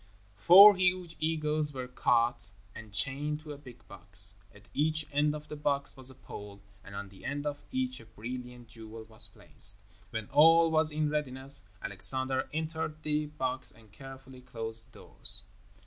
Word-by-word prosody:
Four 195 - +8
huge 180 -2 -1
eagles 155 -2 -1
were 130 -1 -6
caught 120 -2 -1 0.2
and 110 -1 -12
chained 145 +7 0
to 155 -1 -10
a - - -11
big 130 -5 -16
box. 100 +1 +2 0.2
At 105 0 -20
each 155 +1 +2
end 150 +1 0
of 150 0 -10
the - - -8
box 140 -1 -2
was 130 -1 -5
a 130 - -12
pole, 100 -5 -11 0.2
and 100 - -12
on 100 0 -7
the 95 - -18
end 145 +1 -5
of 145 -1 -5
each 255 -1 -2
a - - -16
brilliant 125 +1 -9
jewel 110 -1 -11
was 110 0 -15
placed. 100 +1 -1 0.3
When 110 +1 -6
all 165 +3 +5
was 160 0 +3
in 150 0 -2
readiness, 135 -5 +2 0.2
Alexander 130 +6 +3
entered 160 0 -5
the 150 0 -2
box 130 -3 +1
and 110 -2 -19
carefully 135 +1 -13
closed 115 -2 -7
the - - -15
doors. 100 0 -2
135 Hz, 170 wpm, -29 LUFS, 115-150 Hz, 0.3 s, Four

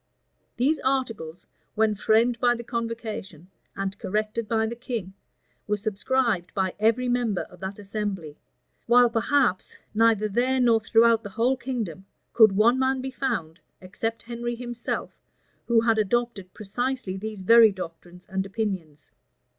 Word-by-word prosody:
These 280 +6 +2
articles, 225 -11 -2 0.3
when 220 0 +2
framed 225 +3 +2
by 245 0 +3
the 235 - -7
convocation, 225 - -5 0.2
and 195 0 -3
corrected 215 +3 -2
by 220 0 +1
the 230 +2 -4
king, 230 -6 -5 0.5
were 210 0 0
subscribed 210 -1 -1
by 190 -2 0
every 230 +4 +2
member 240 -6 0
of 180 - -16
that 190 +2 -6
assembly; 200 -7 -5 0.5
while, 240 0 +6
perhaps, 235 -3 +1 0.2
neither 220 -1 +3
there 250 +5 +1
nor 230 -3 +4
throughout 225 +1 +4
the 205 - -8
whole 230 +6 +1
kingdom, 225 -9 -5 0.3
could 220 -4 +6
one 230 +6 +4
man 265 0 +1
be 265 +1 -4
found, 205 -12 -3 0.2
except 225 +5 -4
Henry 240 0 -4
himself, 240 0 -5 0.5
who 235 -1 +4
had 225 -1 +2
adopted 215 -3 -1
precisely 235 0 -3
these 210 0 -6
very 230 +2 +7
doctrines 180 -1 -9
and 190 0 -2
opinions. 190 -7 -5
225 Hz, 140 wpm, -25 LUFS, 195-240 Hz, 0.5 s, very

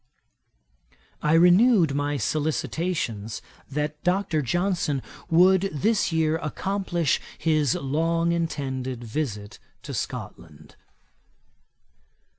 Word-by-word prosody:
I 150 - +2
renewed 175 - +5
my 145 +1 -1
solicitations 150 - -2 0.3
that 150 +2 -3
Dr. 180 -3 +1
Johnson 175 -2 0 0.3
would 185 +3 +5
this 195 +6 +1
year 160 -1 +1
accomplish 175 0 -1 0.2
his 155 -5 +2
long 165 +4 0
intended 130 -7 -3
visit 110 -4 -4 0.2
to - - -7
Scotland. 80 -2 -7
155 Hz, 80 wpm, -25 LUFS, 140-175 Hz, 0.3 s, renewed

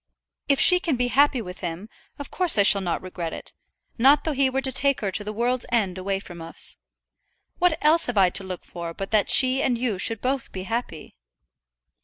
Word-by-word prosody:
If 280 -1 +1
she 360 -1 +7
can 325 -6 -2
be 245 0 -1
happy 275 -2 +2
with 180 -1 -10
him, 175 +3 -6 0.3
of 285 - -9
course 360 -8 +4
I 200 - +5
shall 200 0 +5
not 175 -2 -4
regret 175 -3 -6
it; - - -9 0.5
not 275 +4 +4
though 320 - -2
he 275 -2 +1
were 265 +1 -2
to 265 - 0
take 275 +1 +1
her 200 -3 -2
to 205 - -3
the 210 - -6
world's 240 +3 -2
end 195 -6 -1
away 195 +1 -3
from 175 -3 -12
us. 165 - -6 0.8
What 355 -3 +2
else 325 +2 +4
have 245 -3 -4
I 185 -2 +4
to 195 - 0
look 185 -1 -8
for 170 -1 -8
but 195 - -7
that 215 -2 +1
she 260 0 +5
and 245 -3 0
you 230 -6 -3
should 225 +2 -1
both 260 +1 -3
be 185 - -7
happy?" 210 - -6
225 Hz, 220 wpm, -23 LUFS, 190-270 Hz, 0.8 s, she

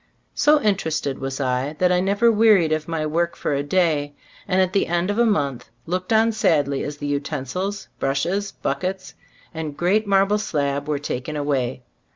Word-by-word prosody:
So 300 0 +4
interested 160 -9 0
was 135 +1 -4
I, 130 +2 -1
that 180 -1 +3
I 180 - +3
never 200 +5 +3
wearied 210 -7 +4
of 155 0 -1
my 160 -2 -2
work 170 +3 0
for - - -2
a 140 - 0
day, 145 -2 0 0.3
and 190 -1 +1
at 185 -1 +2
the 200 - +2
end 175 +3 0
of 205 - -2
a 235 - +4
month 140 - -1 0.2
looked 185 +3 -3
on 225 +1 +4
sadly 145 -10 +1
as 145 0 -5
the 145 - -6
utensils, 145 +7 -3
brushes, 175 +10 -1
buck 140 0 -3
ets 185 +1 -4 0.4
and 155 -3 -5
great 205 +5 +1
marble 200 +1 +3
slab 145 -6 -2
were 150 -1 0
taken 145 +1 -4
away. 135 -4 -1
160 Hz, 185 wpm, -22 LUFS, 145-195 Hz, 0.4 s, So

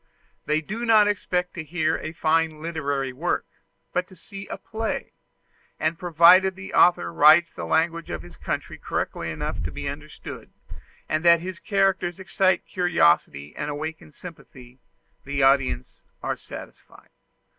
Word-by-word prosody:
They 155 +1 +1
do 210 +9 -5
not 220 -3 +5
expect 180 -3 -1
to 170 - -5
hear 160 0 0
a 160 - -5
fine 160 -1 +1
literary 145 -5 -2
work, 160 +7 -1 0.5
but 180 0 0
to 190 - -16
see 195 +3 -10
a - - -6
play; 220 0 -4 0.7
and 160 +1 -1
provided 180 +2 +5
the 190 0 -9
author 85 - +4
writes 155 - +6
the - - -6
language 165 +1 0
of 80 -1 -5
his 90 - -13
country - - -5
correctly - - -3
enough - - -4
to 75 -1 -3
be - - -5
understood, - - -8 0.6
and 155 +1 -1
that 170 -1 +6
his 185 0 -6
characters 195 -3 0
excite 190 -1 +1
curiosity 80 - +1
and 145 - -4
awaken 155 +2 -6
sympathy, 130 -7 -13 0.4
the 140 0 -1
audience 135 - +1 0.2
are - - -1
satisfied. - - -12
165 Hz, 145 wpm, -24 LUFS, 145-180 Hz, 0.7 s, writes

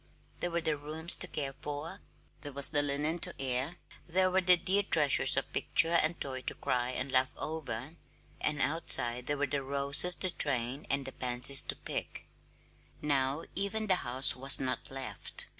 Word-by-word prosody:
There 175 - -3
were 170 0 -3
the 160 -2 -3
rooms 155 +4 +5
to 180 - -4
care 140 -5 -5
for, 145 +2 -7 0.4
there 145 - -8
was 140 +1 +5
the 145 -2 +3
linen 145 +4 -2
to - - -4
air, 135 +4 -3 0.3
there 185 +2 0
were 190 +1 +1
the 180 -1 +4
dear 195 +4 -1
treasures 155 -8 +3
of - - -4
picture 165 +1 +1
and 160 +2 -3
toy 130 -2 -5
to - - -4
cry 125 -2 -3
and 130 +1 -6
laugh 130 0 +2
over; 155 -1 -7 0.4
and 150 0 -2
outside 125 -6 +1
there 145 - -2
were 145 - -1
the 145 0 -4
roses 140 +5 +2
to 185 - -1
train 130 -2 +3
and 135 0 -2
the 135 - -6
pansies 125 +2 +5
to - - -4
pick. - - -6 0.7
Now, 140 +1 -2
even 200 +3 -4
the 190 -3 +1
house 130 0 -1
was 135 +2 +1
not 130 -1 -5
left. 135 0 -8
145 Hz, 180 wpm, -29 LUFS, 135-165 Hz, 0.7 s, rooms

